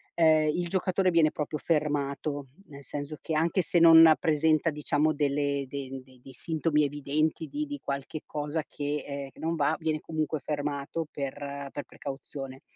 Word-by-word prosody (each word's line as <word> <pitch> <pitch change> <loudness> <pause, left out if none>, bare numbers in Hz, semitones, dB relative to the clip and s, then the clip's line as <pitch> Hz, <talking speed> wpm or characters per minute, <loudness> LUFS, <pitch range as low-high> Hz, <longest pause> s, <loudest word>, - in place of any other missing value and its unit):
ehm, 155 -2 +5
il 175 +3 -2
giocatore 185 +1 +1
viene 165 -2 +5
proprio 150 0 -4
fermato, 145 -2 -1 0.2
nel 140 -1 -11
senso 145 +3 -5
che, 160 - -3
anche 170 +4 +2
se 175 - 0
non 165 -1 +9
presenta, 160 0 +2
diciamo, 150 +1 +1
delle 140 -1 0
de 135 -1 -6
de 130 -1 -20
dei 135 - -12
sintomi 155 +2 0
evidenti 145 +3 -1
di 300 - -4
di 290 0 -5
qualche 140 +2 -4
cosa 150 +1 -3
che, 145 0 -3
ehm, 140 -1 -5
che - - -20
non 165 +1 -1
va, 155 -1 +1
viene 155 -2 -1
comunque 155 0 -2
fermato 145 +2 -3
per 140 0 -5
per 145 - -5
precauzione. 135 -1 -8
150 Hz, 165 wpm, -28 LUFS, 140-160 Hz, 0.2 s, non